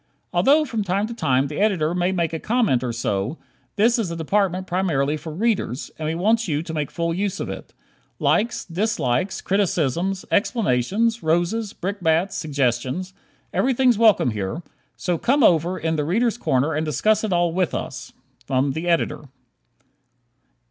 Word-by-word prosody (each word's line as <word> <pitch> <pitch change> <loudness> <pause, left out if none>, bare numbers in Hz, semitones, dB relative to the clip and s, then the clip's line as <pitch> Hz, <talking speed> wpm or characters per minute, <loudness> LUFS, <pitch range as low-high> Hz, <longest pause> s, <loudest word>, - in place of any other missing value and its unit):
Although 300 +3 +4
from 225 -6 -2
time 195 +2 0
to 235 - -6
time 135 - +1
the 145 +1 -5
Editor 180 -6 +1
may 180 +1 +1
make 170 -3 -1
a 160 - -2
comment 215 - +1
or 125 - -1
so, 110 +3 -2 0.4
this 230 +4 +3
is 210 -6 -1
a 170 - -4
department 185 +2 0
primarily 165 -6 0
for 155 +1 -7
Readers, 190 - -1
and 155 - -2
we 160 - -1
want 220 +6 +2
you 150 -1 -1
to 165 - -7
make 150 -3 -2
full 170 -1 -2
use 195 +2 -2
of - - -4
it. - - -9 0.5
Likes, 230 +3 +1
dislikes, 185 - -1
criticisms, 185 -1 0
explanations, 220 - +1
roses, 175 +7 0
brickbats, 180 -1 0
suggestions 140 +4 -1 0.4
everything's 255 -3 +2
welcome 215 - +4
here: 105 - -4 0.3
so 175 -3 -1
"come 275 +2 +2
over 175 0 +3
in 160 0 -1
'The 150 - 0
Readers' 225 +8 +1
Corner'" 135 - +1
and 155 +2 -1
discuss 185 - +1
it - - 0
with 195 - -1
all 175 +1 +1
of 180 - 0
us! - - -6 0.4
_ 135 +1 +1
The 160 +4 -4
Editor. 165 -3 0
175 Hz, 165 wpm, -22 LUFS, 155-210 Hz, 0.5 s, Although